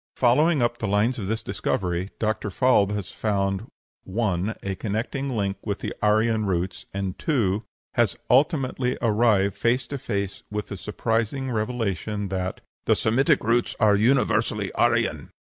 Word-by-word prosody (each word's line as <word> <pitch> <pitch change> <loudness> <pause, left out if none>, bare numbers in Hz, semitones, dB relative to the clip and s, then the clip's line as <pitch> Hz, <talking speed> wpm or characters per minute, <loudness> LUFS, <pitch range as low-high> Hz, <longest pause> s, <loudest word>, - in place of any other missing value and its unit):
Following 140 +4 +3
up 120 0 0
the 110 - -2
lines 105 +6 +1
of 100 - -4
this 110 +2 -2
discovery, 90 0 -2
Dr. 110 -1 -1
Falb 105 -2 +3
has 100 -3 -4
found 100 0 -1 0.4
(1) 100 0 -1
a 100 - -2
connecting 115 +8 -3
link 100 -5 -1
with 100 -1 -2
the - - -4
Aryan 110 0 +2
roots, 90 0 -2
and 95 -2 -4
(2) 110 - +1 0.3
has 120 -4 +2
ultimately 130 -2 +2
arrived 105 -4 +3
face 120 +2 +1
to 140 +2 -5
face 100 -6 -3
with 105 0 -4
the 100 - -5
surprising 115 +6 -1
revelation 105 -3 -2
that 95 -1 -3 0.2
"the - - +4
Semitic 135 +7 +2
roots 115 +2 +1
are 105 -1 +5
universally 125 +6 +2
Aryan." - - +1
110 Hz, 145 wpm, -25 LUFS, 100-120 Hz, 0.4 s, are